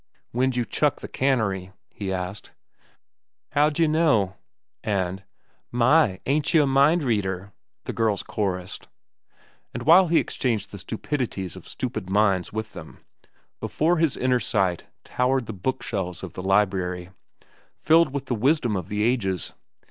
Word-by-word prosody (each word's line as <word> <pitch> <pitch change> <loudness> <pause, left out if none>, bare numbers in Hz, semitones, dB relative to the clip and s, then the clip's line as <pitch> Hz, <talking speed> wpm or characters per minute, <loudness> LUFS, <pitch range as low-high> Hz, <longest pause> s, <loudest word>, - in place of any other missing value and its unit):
"When'd 130 +1 +1
you 120 -1 0
chuck 145 +3 0
the - - -6
cannery?" 100 -8 0 0.2
he 100 -2 -5
asked. 95 +2 -4 1.0
"How'd 145 +1 +2
yeh 165 - +4
know?" 150 - +2 0.5
and, 95 -2 -1 0.5
"My, 120 -4 +3
ain't 145 +2 +1
cheh 165 -2 +4
a - - +2
mind 140 +5 +4
reader!" 100 -5 -1 0.3
the - - -5
girls 110 -3 0
chorussed. 90 -3 -3 0.9
And 120 - -4
while 175 +6 +7
he 165 0 +3
exchanged 115 -6 -1
the 100 - -8
stupidities 110 - -3
of - - -12
stupid 110 -7 -4
minds 95 -2 +2
with 110 0 -5
them, - - -11 0.5
before 170 +3 +1
his 160 -3 +1
inner 125 0 +2
sight 95 -7 0 0.2
towered 130 0 0
the 110 - -6
book 130 +8 -3
shelves 95 -4 -4
of 90 -4 -7
the - - -6
library, 95 -2 0 0.7
filled 165 -2 +4
with 140 -1 -4
the 130 - -2
wisdom 125 -1 +2
of 90 -4 -4
the 105 0 -1
ages. 95 - 0
110 Hz, 150 wpm, -25 LUFS, 95-135 Hz, 1.0 s, while